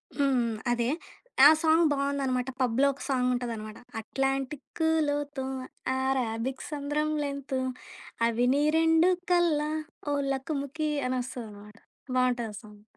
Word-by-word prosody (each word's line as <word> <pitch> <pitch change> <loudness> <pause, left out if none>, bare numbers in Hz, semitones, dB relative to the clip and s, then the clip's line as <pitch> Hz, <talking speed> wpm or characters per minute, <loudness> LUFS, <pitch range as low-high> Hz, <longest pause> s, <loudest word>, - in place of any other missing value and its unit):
హ్మ్. - - -12
హ్మ్. 255 -5 +2 0.2
అదే 240 0 +1 0.6
ఆ - - +10
సాంగ్ 325 0 +4
బావుందనమాట. 275 -2 -1
పబ్‌లో 255 +2 +3
ఒక 275 - -15
సాంగుంటదనమాట. 245 -5 -1 0.2
అట్లాంటిక్కులోతో 285 +3 -1 0.6
ఆరాబిక్ 255 -1 -1
సంద్రం 295 +1 -1
లెంతు 280 -2 -3 0.7
అవి 235 +1 +1
నీ 285 +1 +2
రెండు 325 +2 +5 0.2
కల్లా 325 -4 +3 0.4
ఓ - - +2 0.2
లకుముఖి 280 +2 -2 0.2
అనొస్తదనమాట. 225 -5 -5 0.4
బావుంటదా 245 -3 +1
సాంగు. 210 -1 -15
270 Hz, 100 wpm, -28 LUFS, 245-290 Hz, 0.7 s, ఆ